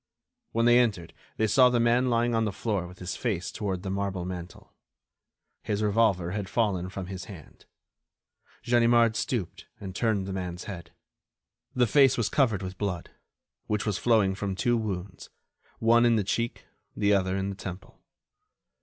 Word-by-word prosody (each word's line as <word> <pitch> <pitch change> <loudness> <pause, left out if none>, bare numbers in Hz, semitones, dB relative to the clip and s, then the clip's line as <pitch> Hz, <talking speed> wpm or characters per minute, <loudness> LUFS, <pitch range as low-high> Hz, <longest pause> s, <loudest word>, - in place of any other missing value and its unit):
When 115 0 +1
they 120 +1 +6
entered 100 -9 0 0.2
they 110 - +2
saw 125 +4 +5
the 125 -1 +1
man 120 +2 +3
lying 120 0 +1
on 115 0 +2
the 105 - -1
floor 100 -3 -2
with 90 +1 -13
his 90 -1 -5
face 100 -8 -2
toward 95 -3 -3
the 95 - -3
marble 95 -2 -2
mantel. 90 -1 -8 0.9
His 105 0 -2
revolver 105 -5 +2
had 100 -1 -4
fallen 95 -6 0
from 95 -1 -6
his 95 0 -7
hand. 90 -8 -13 1.0
Ganimard 120 -1 +4
stooped 110 -9 -3
and 95 -2 -7
turned 110 -4 0
the 95 - -5
man's 90 -1 -5
head. 95 -6 -8 0.9
The 125 -1 +4
face 135 +3 +4
was 115 -3 0
covered 115 -9 +1
with 95 0 -7
blood, 95 -5 -3 0.6
which 105 0 -1
was 105 -2 -1
flowing 110 -5 +3
from 100 0 -3
two 120 +5 +1
wounds, 100 -4 -4 0.5
one 115 +1 +4
in 120 -1 +4
the 105 - +1
cheek, 115 +4 -2 0.3
the 100 0 +3
other 95 -1 +1
in 95 0 -2
the - - -7
temple. 95 0 -9
100 Hz, 170 wpm, -27 LUFS, 95-115 Hz, 1.0 s, they